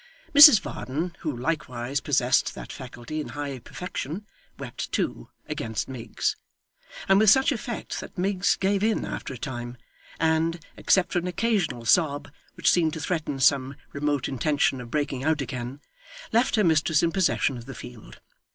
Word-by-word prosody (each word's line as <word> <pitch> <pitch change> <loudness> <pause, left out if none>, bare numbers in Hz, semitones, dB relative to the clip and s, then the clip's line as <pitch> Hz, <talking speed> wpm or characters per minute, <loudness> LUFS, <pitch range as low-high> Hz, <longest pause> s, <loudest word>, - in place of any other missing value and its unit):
Mrs 290 -6 +11
Varden, 165 +2 -4
who 150 -6 -3
likewise 130 -2 -2
possessed 130 -3 +1
that - - -8
faculty 130 +3 -6
in - - -6
high 140 -3 -4
perfection, 180 - -6 0.3
wept - - -6
too, - - -2 0.2
against 110 -1 -3
Miggs; 130 -4 -3 0.7
and 195 0 +5
with 215 -1 +6
such 265 +8 +5
effect 235 -2 -4
that - - -10
Miggs 190 +1 +1
gave 195 +1 0
in 220 0 +1
after - - -5
a 130 - -6
time, 120 -2 -6 0.4
and, 160 +1 +1 0.2
except 190 -2 +2
for 175 - +2
an 175 - -4
occasional 180 - -1
sob, 145 0 +2 0.2
which - - +3
seemed 160 -3 +2
to - - -5
threaten 155 -4 -2
some 135 0 +3 0.2
remote 145 -1 -1
intention 140 -1 0
of 120 - -9
breaking 145 -2 -2
out 155 0 +1
again, 130 +1 -5 0.5
left 235 +3 +3
her 215 - +3
mistress 160 -2 +3
in 170 - +2
possession 175 -7 +1
of 120 0 -9
the 135 - -8
field. 120 -3 -11
150 Hz, 160 wpm, -26 LUFS, 130-180 Hz, 0.7 s, Mrs